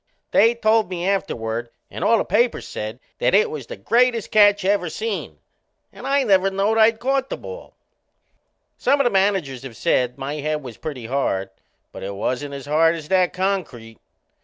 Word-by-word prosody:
They 230 +1 +4
told 220 -3 +2
me 180 0 -3
afterward 120 - -2 0.2
and - - -5
all 230 - +4
the - - -1
papers 230 +5 +1
said 110 +3 -6 0.2
that - - +2
it 210 - +3
was 140 -6 -6
the - - -7
greatest 235 - +1
catch 205 -2 +5
ever 195 -3 +1
seen. 215 +4 -4 0.6
And - - -8
I 280 0 +2
never 195 -4 +3
knowed 200 +3 +1
I'd 220 +1 +5
caught 270 +2 0
the - - -4
ball! 485 +1 -10 1.0
Some 285 - +2
o' - - +4
the 245 - +2
managers 190 -10 +1
have 130 -4 -10
said 125 -1 +1
my 140 +3 -4
head 150 0 -2
was 120 -4 -9
pretty 135 -7 -6
hard, 105 -7 -1 0.4
but - - -10
it 100 +1 -5
wasn't 135 +7 -3
as 140 - -8
hard 160 +3 +3
as 155 -2 -9
that 185 -1 +3
concrete. 170 - -3
185 Hz, 185 wpm, -22 LUFS, 135-215 Hz, 1.0 s, catch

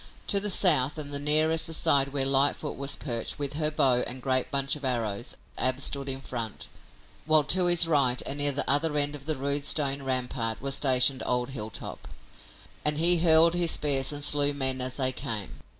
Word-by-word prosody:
To 200 - +2
the 205 +1 -1
south 155 -8 +4
and 145 -2 -6
nearest 155 +2 +3
the 165 - -7
side 140 -2 +2
where 135 -1 0
Lightfoot 140 +2 +1
was 140 0 -1
perched 115 -5 -3
with 145 -1 -1
her 150 0 -1
bow 130 -5 +1
and 130 +1 -4
great 130 0 0
bunch 140 0 -1
of 145 - -13
arrows 120 -4 -3 0.2
Ab 130 +1 +1
stood 140 0 -1
in 135 0 -3
front, 115 -5 -6 0.6
while 155 -1 +4
to 180 +6 +1
his 175 -1 +4
right 135 -6 0
and 140 +1 -4
near 145 0 +3
the 140 - -1
other 150 +2 0
end 145 0 +1
of 145 0 -11
the 155 - +1
rude 140 +1 -2
stone 140 -2 0
rampart 125 -3 -3
was 135 0 -4
stationed 130 -1 +2
old 125 +1 -3
Hilltop, 110 -4 -8 0.8
and 150 0 +1
he 170 +2 +5
hurled 165 0 +4
his 175 -1 0
spears 135 -2 0
and 145 -1 -4
slew 145 0 +3
men 130 -2 -2
as 130 0 -2
they 130 -2 +1
came. 110 -5 -5
140 Hz, 200 wpm, -26 LUFS, 130-150 Hz, 0.8 s, he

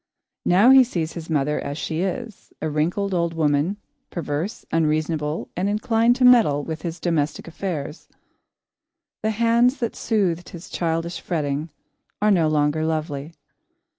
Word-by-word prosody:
Now 200 +8 +6
he 265 -1 +9
sees 165 -10 -3
his 170 -1 -8
mother 150 -1 +1
as 145 - -5
she 160 +1 -2
is; 210 +4 -5
a 155 - -2
wrinkled 180 +6 0
old 170 -2 0
woman, 155 +4 +1 0.3
perverse, 165 +4 -4
unreasonable, 155 -1 0
and 185 +3 0
inclined 225 +3 +2
to 255 0 +3
meddle 220 - +5
with 160 0 -5
his 170 -1 -5
domestic 165 -3 -1
affairs. 170 -3 -5 1.1
The 220 - 0
hands 235 +4 +3
that 235 - -3
soothed 185 -6 0
his 170 -1 -10
childish 165 0 -2
fretting 150 -2 -2 0.5
are 210 +1 +3
no 170 -5 +3
longer 150 0 +1
lovely. 155 -1 -3
165 Hz, 140 wpm, -23 LUFS, 155-205 Hz, 1.1 s, he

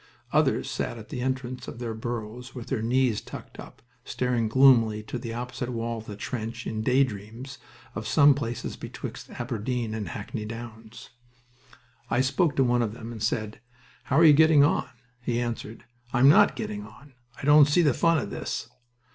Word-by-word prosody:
Others - - +2
sat - - -3
at - - -11
the 125 - -4
entrance 130 -1 -3
of - - -7
their 120 -2 -4
burrows 120 +2 -6
with 120 -2 -8
their 125 -5 -1
knees 120 -1 +1
tucked - - -10
up, - - -12 0.2
staring 125 -3 -1
gloomily 115 -4 +5
to 110 +3 -5
the 115 -1 -6
opposite 120 +1 -5
wall 115 -1 -3
of 110 - -12
the 105 - -6
trench 115 +2 -5
in 110 -1 -3
day 130 +4 +4
dreams 115 +4 -7 0.3
of 110 -1 -5
some 145 +2 +6
places 120 -4 -4
betwixt - - -8
Aberdeen 115 0 -3
and 110 -2 -4
Hackney 110 +1 -5
Downs. 115 0 -9 1.0
I 120 - +2
spoke 145 +4 +1
to 135 - +3
one 120 -1 +2
of 110 -3 -1
them, 115 -1 -8
and 110 -3 -8
said, 110 -1 -2 0.4
"How 135 - +1
are 165 - +7
you 155 - +9
getting 155 -1 +6
on?" 140 -2 +1 0.3
He 120 -1 -1
answered, 120 -2 -5 0.3
"I'm 130 +1 +5
not 205 +8 +6
getting 210 -1 -5
on... 145 -8 -15 0.3
I - - -6
don't 145 0 +7
see 160 +4 +3
the 145 -5 +4
fun 165 +5 +3
of 145 - -3
this." - - -4
120 Hz, 185 wpm, -26 LUFS, 110-135 Hz, 1.0 s, you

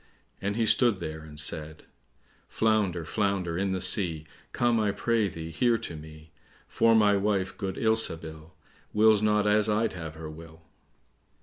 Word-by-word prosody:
And 100 +1 -2
he 115 0 +1
stood 120 -2 +3
there 80 -2 -5
and 75 -1 -8
said— 75 0 -2 0.7
"Flounder, 105 -7 0
flounder 100 -3 -1
in 95 +2 -1
the 95 - -1
sea, 90 -4 0 0.3
Come, 120 -1 +1
I 105 -2 +1
pray 115 +1 0
thee, 80 -2 -7
here 115 +8 +2
to 85 - -7
me; 80 0 -12 0.4
For 115 0 +3
my 105 -2 +4
wife, 100 -1 0
good 95 -1 -4
Ilsabil, 80 -8 -1 0.4
Wills 110 -1 +4
not 105 -1 +2
as 105 +1 +2
I'd 110 +2 +1
have 80 -3 -7
her 80 0 -8
will." 80 +1 -12
95 Hz, 160 wpm, -27 LUFS, 80-110 Hz, 0.7 s, my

